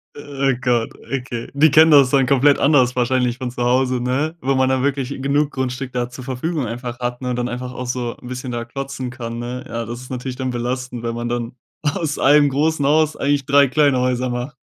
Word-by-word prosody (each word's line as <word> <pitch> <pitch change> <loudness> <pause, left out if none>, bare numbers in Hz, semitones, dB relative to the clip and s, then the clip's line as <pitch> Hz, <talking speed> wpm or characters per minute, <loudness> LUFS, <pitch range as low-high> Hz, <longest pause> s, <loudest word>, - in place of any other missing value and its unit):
Oh 140 -2 -1
Gott, 120 -2 0 0.2
okay. 125 -3 -4
Die 150 +1 +5
kennen 160 +2 +7
das 140 -4 +6
dann 135 -2 +3
komplett 140 +2 +4
anders 130 -4 +3
wahrscheinlich 125 0 +1
von 130 -2 -3
zu 120 0 -4
Hause, 125 +1 +2
ne, 140 +7 -1
weil 135 +1 +1
man 130 0 +2
dann 130 -1 +1
wirklich 135 -2 -1
genug 140 +2 0
Grundstück 130 0 -4
da 125 -1 -2
zur 125 +1 -10
Verfügung 135 +2 -3
einfach 120 +1 -6
hat, 120 +1 -3
ne, 125 - -1
dann 125 0 -2
einfach 125 +1 -5
auch 125 0 -6
so 125 -1 -3
'n - - -10
bisschen 125 0 -5
da 120 -1 -3
klotzen 135 +1 -5
kann, 115 -1 -6
ne? 125 +2 -5
Ja, 115 0 -4
das 120 +2 -7
ist 130 - -11
natürlich 125 0 -4
dann 130 0 -3
belastend, 125 0 -3
wenn 115 0 -3
man 120 0 -3
dann 120 0 -3 0.3
aus 150 0 -2
einem 145 +1 +5
großen 150 +1 0
Haus 155 +1 +2
eigentlich 140 -1 0
3 140 0 +5
kleine 140 -1 +3
Häuser 125 0 0
macht. 125 +4 -4
130 Hz, 220 wpm, -20 LUFS, 125-140 Hz, 0.3 s, kennen